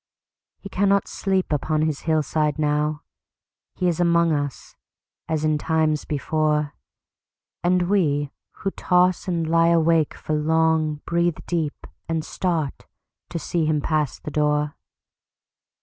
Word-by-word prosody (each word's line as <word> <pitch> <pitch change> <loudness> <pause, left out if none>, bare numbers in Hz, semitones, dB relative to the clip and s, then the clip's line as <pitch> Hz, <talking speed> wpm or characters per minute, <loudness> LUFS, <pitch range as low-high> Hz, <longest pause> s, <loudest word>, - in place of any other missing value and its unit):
He - - -10
cannot 200 +1 +2
sleep 190 -4 -1
upon 155 +2 0
his 155 -2 -1
hillside 155 -1 +1
now. 150 0 0 0.7
He 180 - 0
is 170 -2 0
among 170 -1 +3
us:—as 150 +2 -5
in 155 -1 +2
times 155 -1 +1
before! 150 0 0 0.9
And 180 +1 +3
we 150 -7 +1 0.3
who 195 - 0
toss 180 +1 +2
and 170 -3 -1
lie 165 +1 +4
awake 165 -2 +3
for 155 - -4
long, 155 0 +1
Breathe 170 -1 +1
deep, 160 -4 -2 0.2
and 160 -1 -1
start, 165 -7 -2 0.4
to 170 - -4
see 165 0 -1
him 155 -1 +2
pass 150 -2 0
the 150 - -8
door. 150 0 +1
155 Hz, 125 wpm, -23 LUFS, 150-170 Hz, 0.9 s, lie